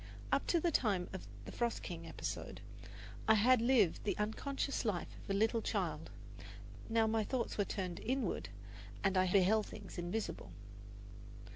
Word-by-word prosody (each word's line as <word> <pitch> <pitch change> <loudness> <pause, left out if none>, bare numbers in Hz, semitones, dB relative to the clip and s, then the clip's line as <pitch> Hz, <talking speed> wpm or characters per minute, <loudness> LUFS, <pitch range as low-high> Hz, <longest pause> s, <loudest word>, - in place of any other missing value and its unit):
Up - - +2
to 340 - +3
the 340 +1 +1
time 200 - +1
of 190 - -6 0.2
the - - -7
"Frost 235 -1 -1
King" 165 -2 -6
episode, - - -5 0.7
I 220 - +7
had 240 +3 +5
lived 230 -8 +3
the 210 - -1
unconscious 275 +6 -1
life 205 -7 -2
of - - -14
a - - +2
little 225 +3 +2
child; - - -2 0.8
now 225 0 +4
my 220 0 +2
thoughts 245 +2 -2
were 205 - +1
turned 185 -4 -3
inward, 235 - -1 0.5
and 195 -1 +2
I 185 -1 +3
beheld 205 +3 +4
things - - -8
invisible. 175 +6 -3
215 Hz, 155 wpm, -36 LUFS, 190-235 Hz, 0.8 s, I